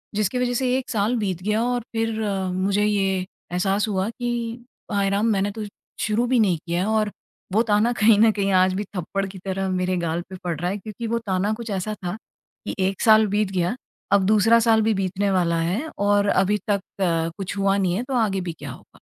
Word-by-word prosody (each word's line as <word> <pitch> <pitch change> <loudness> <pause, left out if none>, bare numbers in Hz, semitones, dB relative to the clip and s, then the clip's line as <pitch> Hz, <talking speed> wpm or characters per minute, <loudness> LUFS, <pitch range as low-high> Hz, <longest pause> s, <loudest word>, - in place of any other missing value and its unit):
जिसकी 215 +4 0
वजह 245 0 0
से 255 +1 0
1 260 - -5
साल 220 +2 +1
बीत 190 -5 -2
गया 215 +2 +1
और 245 0 0
फिर 225 0 0 0.4
मुझे 195 +2 +1
ये 210 -1 +2 0.5
एहसास 195 +4 +1
हुआ 190 -1 0
कि 240 +1 -4 0.6
हाय 200 -1 +1
राम! 200 +2 +1
मैंने 200 0 +1
तो 220 +1 -6 0.4
शुरू 215 +3 +1
भी 250 -1 +3
नहीं 185 -6 +3
किया 175 +4 -1
और 215 -1 +1 0.4
वो 220 - +4
ताना 215 +1 +2
कहीं 215 -1 +6
न 220 0 +6
कहीं 200 -2 -1
आज 185 0 +3
भी 200 +2 -2
थप्पड़ 195 +3 -2
की 190 0 -10
तरह 190 0 -2
मेरे 185 0 0
गाल 170 0 -1
पे 190 - -7
पड़ 170 -4 -3
रहा 175 - -1
है, 205 - -3
क्योंकि 215 +3 -6
वह 235 +1 0
ताना 195 +2 0
कुछ 230 0 -6
ऐसा 200 +1 -2
था 175 +4 -2 0.5
कि - - -3
1 195 - -4
साल 220 -1 +6
बीत 205 -1 0
गया, 180 +3 0 0.4
अब 200 -1 +5
दूसरा 215 +3 +5
साल 220 -1 +5
भी 220 0 +2
बीतने 195 +1 -1
वाला 170 -3 +1
है 200 - -1
और 205 0 +2
अभी 200 +2 +2
तक 200 -1 +2 0.6
कुछ 195 0 -5
हुआ 195 0 +2
नहीं 185 -3 +1
है 230 - -1
तो 265 - -5
आगे 205 -5 +1
भी 175 -2 -4
क्या - - -6
होगा? - - -15
200 Hz, 215 wpm, -23 LUFS, 190-220 Hz, 0.6 s, कहीं